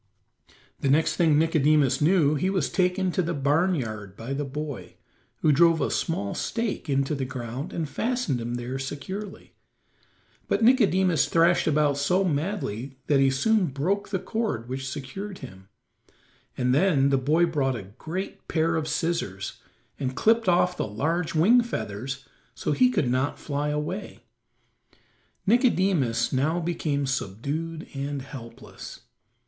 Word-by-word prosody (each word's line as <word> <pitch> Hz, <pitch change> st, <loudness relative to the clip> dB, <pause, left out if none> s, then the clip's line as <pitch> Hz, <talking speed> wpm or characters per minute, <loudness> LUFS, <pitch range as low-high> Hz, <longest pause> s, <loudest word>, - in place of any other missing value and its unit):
The 135 Hz, -, 0 dB
next 155 Hz, +4 st, +3 dB
thing 160 Hz, -4 st, +4 dB
Nicodemus 150 Hz, -4 st, +3 dB
knew 155 Hz, -2 st, +4 dB
he 155 Hz, +6 st, 0 dB
was 185 Hz, -6 st, 0 dB
taken 185 Hz, 0 st, +1 dB
to 185 Hz, -, +1 dB
the 170 Hz, -1 st, -2 dB
barn 150 Hz, +7 st, +2 dB
yard 110 Hz, -, -5 dB
by 120 Hz, +4 st, -5 dB
the 145 Hz, +2 st, -2 dB
boy, 145 Hz, 0 st, -6 dB, 0.5 s
who 155 Hz, -, +4 dB
drove 165 Hz, +2 st, +5 dB
a 140 Hz, -, 0 dB
small 100 Hz, -12 st, -1 dB
stake 225 Hz, -8 st, -3 dB
into 135 Hz, +1 st, +1 dB
the 140 Hz, -2 st, -2 dB
ground 130 Hz, +2 st, -5 dB
and 165 Hz, -3 st, -3 dB
fastened 225 Hz, -, -1 dB
him 120 Hz, +1 st, -3 dB
there 125 Hz, +2 st, -4 dB
securely. 185 Hz, +9 st, -6 dB, 0.9 s
But -, -, +1 dB
Nicodemus 190 Hz, -, +4 dB
thrashed 170 Hz, +1 st, +3 dB
about 150 Hz, -2 st, +2 dB
so 180 Hz, +7 st, +2 dB
madly 145 Hz, -, -2 dB
that 145 Hz, -2 st, +3 dB
he 135 Hz, 0 st, +5 dB
soon 190 Hz, +9 st, +2 dB
broke 175 Hz, +10 st, -1 dB
the 195 Hz, -, 0 dB
cord 200 Hz, -, -3 dB
which 135 Hz, +1 st, -4 dB
secured 185 Hz, +9 st, -6 dB
him, 95 Hz, +1 st, -12 dB, 0.9 s
and 125 Hz, 0 st, +1 dB
then 140 Hz, -3 st, +3 dB
the 135 Hz, -, +4 dB
boy 155 Hz, +6 st, +3 dB
brought 140 Hz, -6 st, 0 dB
a 110 Hz, -, -5 dB, 0.2 s
great 185 Hz, +5 st, -5 dB
pair 165 Hz, 0 st, +1 dB
of 155 Hz, -1 st, -2 dB
scissors 150 Hz, -, -2 dB, 0.4 s
and 130 Hz, -2 st, -2 dB
clipped 225 Hz, +4 st, +3 dB
off 180 Hz, 0 st, +3 dB
the -, -, -1 dB
large 160 Hz, +11 st, -1 dB
wing 220 Hz, +11 st, +6 dB
feathers 135 Hz, -, -5 dB, 0.3 s
so -, -, -2 dB
he 250 Hz, -, +4 dB
could 200 Hz, -, 0 dB
not 130 Hz, +3 st, 0 dB
fly 145 Hz, 0 st, -2 dB
away; 150 Hz, +7 st, -4 dB, 1.2 s
Nicodemus 185 Hz, -, +2 dB
now 150 Hz, +6 st, +1 dB
became 155 Hz, -4 st, -1 dB
subdued 140 Hz, -, -3 dB
and 140 Hz, 0 st, -4 dB
helpless. 130 Hz, -4 st, -10 dB
150 Hz, 145 wpm, -26 LUFS, 135-180 Hz, 1.2 s, wing